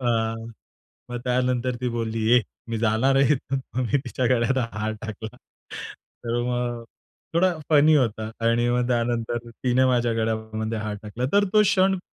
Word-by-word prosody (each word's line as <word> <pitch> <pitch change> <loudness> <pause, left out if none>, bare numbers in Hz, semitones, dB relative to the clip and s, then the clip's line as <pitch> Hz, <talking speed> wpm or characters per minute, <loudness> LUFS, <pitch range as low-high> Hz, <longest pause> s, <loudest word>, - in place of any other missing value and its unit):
अ, 125 - -3 1.0
मग 120 - -3
त्यानंतर 125 0 +1
ती 125 - 0
बोलली, 115 -1 -2
"ए - - +1 0.3
मी 115 -1 -2
जाणार 115 +5 +2
आहे 135 +1 +5
इथून," 135 +1 -3
मग 130 0 0
मी 140 - +4
तिच्या 125 - -1
गळ्यात 130 +1 +2 0.2
हार 110 0 -2
टाकला. 110 0 -7 0.9
तर 120 +1 0
मग 120 -1 -2 0.5
थोडा 180 +1 +3 0.2
फनी 155 +1 +6
होता 110 -4 0 0.2
आणि 120 +1 +3
मग 125 0 +1
त्यानंतर 120 -1 0
तिने 125 +2 +1
माझ्या 120 -2 +2
गळ्यामध्ये 110 0 -2
हार 105 -1 -3
टाकला 110 +4 -4
तर 200 0 +5
तो 215 0 +6
क्षण 190 -1 +3
120 Hz, 160 wpm, -24 LUFS, 115-130 Hz, 1.0 s, फनी